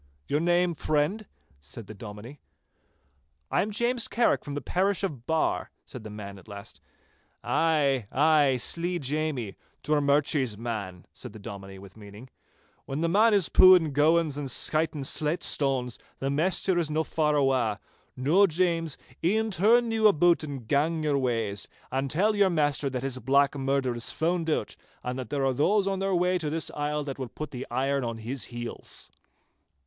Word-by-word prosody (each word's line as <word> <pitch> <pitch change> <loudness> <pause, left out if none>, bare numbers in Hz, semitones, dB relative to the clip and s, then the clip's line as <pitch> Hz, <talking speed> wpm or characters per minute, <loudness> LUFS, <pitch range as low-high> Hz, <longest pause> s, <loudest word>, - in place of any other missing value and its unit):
'Your 145 - +1
name, 175 +1 +2
friend?' 155 +8 -1 0.3
said 75 +10 -10
the 110 - -10
Dominie. 110 +6 -10 1.1
'I - - +2
am 210 - -2
James 235 +2 0
Carrick 235 +1 +1
from 145 - -6
the - - -1
parish 190 +8 0
of 140 -11 -4
Barr,' 160 0 0 0.2
said 125 -4 -9
the 110 - -8
man 100 -2 -8
at - - -19
last. 100 0 -10 0.6
'Ay, 140 -8 +1
ay, 145 -2 +4
slee 170 +8 -1
Jamie—Drummurchie's 145 - -1
man,' 100 -6 -5
said - - -9
the - - -10
Dominie, 95 -1 -9
with 95 0 -13
meaning. 105 +4 -13 0.6
'When 140 +3 -3
the 165 - +1
man 210 +4 +4
is 195 -5 +2
pooin' 180 -5 +6
gowans 155 0 +2
and 140 -2 -4
skytin' 155 +2 0
slate 155 +4 0
stanes, 130 -4 -1 0.2
the 135 +1 -2
maister 175 +4 +1
is 165 -3 -1
no 155 +1 0
that - - -16
far 150 -2 +2
awa'. 130 -6 +1 0.4
Noo, 165 +10 +4
James, 165 -3 0 0.3
e'en 220 +5 +1
turn 230 +5 +3
you 220 -1 +4
aboot 175 -3 +3
and 140 -6 -7
gang 155 +4 +1
your 145 -2 +1
ways, 115 -6 -2 0.2
and 135 +1 -1
tell 205 +9 +2
your 200 -2 +4
maister 145 -4 0
that 130 -1 -4
his 130 -1 -3
black 140 +4 +3
murder 135 -2 0
is 120 - -3
found 165 +1 -1
out, 155 - -1 0.3
and 125 +1 -4
that 125 -4 -6
there 140 0 -1
are 135 - +2
those 190 +10 +2
on 195 -1 -1
their 195 -1 0
way 180 +1 +2
to 155 -3 -2
this 160 +1 -2
isle 150 0 -2
that 140 -1 -6
will 130 -2 -4
put 155 +6 -7
the 130 0 -6
irons 135 +1 0
on 115 -1 -4
his 115 0 -3
heels. 120 +1 -8
145 Hz, 175 wpm, -27 LUFS, 125-170 Hz, 1.1 s, pooin